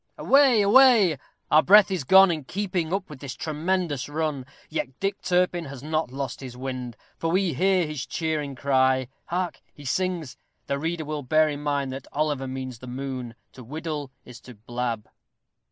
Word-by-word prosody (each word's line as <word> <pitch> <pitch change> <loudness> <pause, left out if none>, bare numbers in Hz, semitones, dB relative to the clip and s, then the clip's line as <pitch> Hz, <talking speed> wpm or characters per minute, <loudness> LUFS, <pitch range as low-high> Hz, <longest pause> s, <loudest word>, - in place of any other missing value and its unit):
Away, 270 -6 +5
away! 210 - +6 0.3
our 155 - +7
breath 205 +2 +6
is 185 -6 -1
gone 190 +5 +7
in 155 -3 -3
keeping 180 -2 -2
up 195 0 -1
with 150 -4 -11
this 135 -2 -7
tremendous 160 -2 -2
run. 150 -4 -2 0.2
Yet 135 -4 -4
Dick 195 +1 -2
Turpin 180 -1 +1
has 135 -2 -9
not 155 -2 -1
lost 135 0 -5
his 125 -2 -9
wind, 125 -2 -5 0.2
for 165 - -1
we 185 -1 +1
hear 185 +4 +2
his 150 -3 -5
cheering 155 -4 -2
cry 130 -1 +2 0.2
hark! 180 0 -3
he 145 - -13
sings. 175 -1 -2 0.3
The 140 0 -2
reader 160 +1 -2
will 150 0 -4
bear 155 +4 +3
in 145 -1 -5
mind 140 -2 -1
that 135 - -8
Oliver 145 -3 -1
means 130 -2 -6
the 125 - -10
moon 125 -2 -5 0.2
to 130 - -12
"whiddle" 150 +2 -5 0.2
is 125 -1 -11
to 125 - -12
blab. 120 0 -4
150 Hz, 175 wpm, -25 LUFS, 130-175 Hz, 0.3 s, our